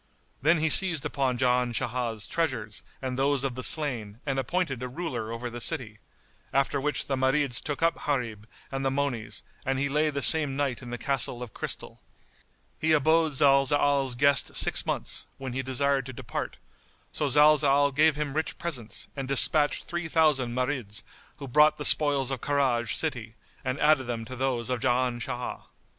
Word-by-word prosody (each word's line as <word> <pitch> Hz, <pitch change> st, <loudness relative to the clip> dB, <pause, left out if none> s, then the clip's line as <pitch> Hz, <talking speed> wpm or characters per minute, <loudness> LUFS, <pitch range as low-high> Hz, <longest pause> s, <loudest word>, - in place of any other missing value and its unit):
Then 160 Hz, +5 st, +4 dB
he 160 Hz, 0 st, +1 dB
seized 175 Hz, -5 st, +3 dB
upon 130 Hz, -3 st, -1 dB
Jan 125 Hz, -1 st, +1 dB
Shah's 120 Hz, -3 st, -3 dB
treasures 120 Hz, -10 st, -2 dB, 0.2 s
and 130 Hz, 0 st, -3 dB
those 140 Hz, 0 st, +1 dB
of 135 Hz, -2 st, -1 dB
the 130 Hz, -, -6 dB
slain 120 Hz, -9 st, +1 dB
and 135 Hz, -2 st, -1 dB
appointed 140 Hz, -2 st, -2 dB
a 125 Hz, -, -3 dB
ruler 125 Hz, -6 st, -5 dB
over 115 Hz, +1 st, -5 dB
the 120 Hz, 0 st, -7 dB
city; 115 Hz, -8 st, -3 dB, 0.5 s
after 140 Hz, +1 st, +1 dB
which 150 Hz, +1 st, -1 dB
the 135 Hz, -, -1 dB
Marids 130 Hz, -1 st, +1 dB
took 145 Hz, +1 st, -4 dB
up 165 Hz, -, 0 dB
Gharib 115 Hz, -7 st, -2 dB, 0.2 s
and 135 Hz, 0 st, -3 dB
the 135 Hz, -, +1 dB
monies 125 Hz, -7 st, -3 dB, 0.2 s
and 135 Hz, -2 st, -1 dB
he 140 Hz, +1 st, 0 dB
lay 150 Hz, +2 st, +1 dB
the 140 Hz, -2 st, -3 dB
same 145 Hz, +3 st, +4 dB
night 140 Hz, -3 st, -2 dB
in 125 Hz, -, -9 dB
the 120 Hz, -, -4 dB
Castle 125 Hz, -1 st, -1 dB
of 115 Hz, -, -10 dB
Crystal. -, -, -5 dB, 0.8 s
He 160 Hz, 0 st, +2 dB
abode 160 Hz, +1 st, +3 dB
Zalzal's 140 Hz, -1 st, +3 dB
guest 140 Hz, +1 st, +2 dB
six -, -, +2 dB
months, -, -, -3 dB
when 130 Hz, -2 st, -6 dB
he 135 Hz, -, -2 dB
desired 135 Hz, +1 st, 0 dB
to 130 Hz, -, -7 dB
depart; -, -, -5 dB, 0.5 s
so -, -, -2 dB
Zalzal 145 Hz, -1 st, +4 dB
gave 155 Hz, 0 st, +4 dB
him 150 Hz, -2 st, -3 dB
rich 160 Hz, +2 st, -3 dB
presents 130 Hz, -10 st, -4 dB
and 135 Hz, -2 st, -5 dB
despatched 145 Hz, +2 st, +4 dB
three 175 Hz, -1 st, -4 dB
thousand 150 Hz, -7 st, +2 dB
Marids, 125 Hz, -5 st, -3 dB, 0.3 s
who 140 Hz, -, -8 dB
brought 150 Hz, +4 st, +4 dB
the 150 Hz, -, -4 dB
spoils 140 Hz, -3 st, +4 dB
of 130 Hz, -3 st, -4 dB
Karaj 130 Hz, -6 st, 0 dB
city 120 Hz, -8 st, -3 dB, 0.3 s
and 130 Hz, +1 st, -3 dB
added 150 Hz, -3 st, +3 dB
them 115 Hz, -2 st, -4 dB
to 130 Hz, -, -7 dB
those 130 Hz, -2 st, -2 dB
of 125 Hz, -, -1 dB
Jan 125 Hz, -1 st, 0 dB
Shah. 120 Hz, +1 st, -5 dB
135 Hz, 180 wpm, -27 LUFS, 125-145 Hz, 0.8 s, Then